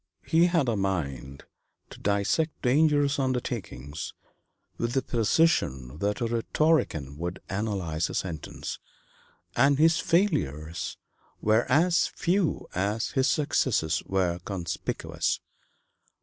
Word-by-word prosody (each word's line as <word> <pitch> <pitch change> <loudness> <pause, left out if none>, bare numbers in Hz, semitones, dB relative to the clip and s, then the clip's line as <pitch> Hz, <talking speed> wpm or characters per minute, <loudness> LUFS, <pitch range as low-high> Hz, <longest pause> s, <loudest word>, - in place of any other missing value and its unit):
He 165 +2 +4
had 165 -6 +2
a 115 - +1
mind 75 -9 -3 0.5
to - - -11
dissect 100 +11 0
dangerous 145 +1 +3
undertakings 105 - -3 0.6
with 120 0 -1
the 135 - +1
precision 95 - +1
that 105 +5 -1
a - - +2
rhetorician 115 - 0
would 85 +2 -4
analyze 95 -6 -1
a - - -5
sentence, 85 -5 -4 0.8
and 140 0 +4
his 160 +2 +4
failures 85 - 0 0.4
were 110 +2 +2
as 170 +5 +4
few 180 -1 0
as 105 +4 -1
his 135 -2 +2
successes 130 - +1
were 90 -2 0
conspicuous. 90 -2 -3
110 Hz, 105 wpm, -27 LUFS, -, 0.8 s, He